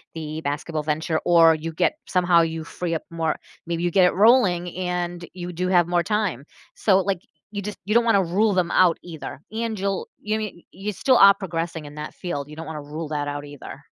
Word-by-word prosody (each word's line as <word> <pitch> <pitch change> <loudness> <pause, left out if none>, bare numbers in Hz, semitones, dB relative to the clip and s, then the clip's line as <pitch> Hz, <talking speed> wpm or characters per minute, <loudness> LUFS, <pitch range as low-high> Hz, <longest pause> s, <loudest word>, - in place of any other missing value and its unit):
the 155 0 -5
basketball 150 +2 -3
venture 155 +1 -1
or 165 -2 +6
you 165 +1 -5
get 220 - +2
somehow 175 -2 +4
you 160 -1 -2
free 170 -1 -4
up - - -4
more 165 -2 -1 0.3
Maybe 170 0 -2
you 175 - +1
get 185 +1 +5
it 180 - +3
rolling 190 -5 +4
and 175 -1 -3
you 180 -1 -6
do 180 +2 -1
have 175 -2 +4
more 175 -1 +1
time. 205 - -1 0.3
So 195 -2 +3
like, 190 -2 -1 0.3
you 205 - -4
just 210 0 -5
you 210 - 0
don't 235 - +6
wanna 200 -4 +4
rule 200 +5 +2
them 180 -2 +1
out 175 -3 +4
either, 160 -5 -8
and 225 -2 -3
you'll 195 -1 -2
you 215 +1 -1
mean 210 -5 -6
you 200 +3 -4
still 255 +5 +3
are 200 0 +8
progressing 165 -4 -4
in 145 - -10
that 150 0 -6
field, 150 -6 -4
you 150 - -10
don't 165 +1 -7
wanna 155 -2 -5
rule 150 +2 -6
that 145 -1 -2
out 145 0 -4
either. 145 -1 -10
175 Hz, 220 wpm, -23 LUFS, 160-195 Hz, 0.3 s, are